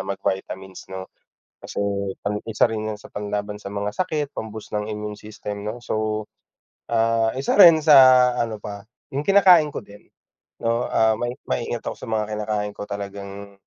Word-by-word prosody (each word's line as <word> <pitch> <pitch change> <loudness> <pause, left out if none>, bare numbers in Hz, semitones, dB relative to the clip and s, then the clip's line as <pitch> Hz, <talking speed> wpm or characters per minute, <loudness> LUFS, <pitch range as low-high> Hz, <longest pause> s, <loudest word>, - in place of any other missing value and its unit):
mag-vitamins, 95 -1 -4
'no, 95 0 -8 0.5
kasi - - -10 0.5
sa 100 - +1 0.2
isa 110 - +3
rin 110 -1 -3
sa - - -15
panlaban 105 0 -4
sa 100 - -7
mga 100 +1 -3
sakit 155 - -2
pam-boost 110 -1 -7
ng 105 0 -2
immune 105 -1 -5
system, 105 -1 -7
'no, 105 +3 -4
so, 110 0 -1 0.7
ah, 115 -1 +2
isa 135 - 0
rin 170 -3 +10
sa 130 -4 +8
ano 115 -2 -2
pa 100 -1 -8 0.3
yung 140 - 0
kinakain 180 -3 +6
ko 130 - -7
din, 100 0 -16 0.6
'no, 115 +1 +1
ah, 110 0 +3
mai 120 +3 -3
maingat 120 -1 -3
ako - - -2
sa - - -9
mga 110 -1 0
kinakain 105 -1 -2
ko - - -7
talagang, 100 0 -7
110 Hz, 160 wpm, -23 LUFS, 105-120 Hz, 0.7 s, rin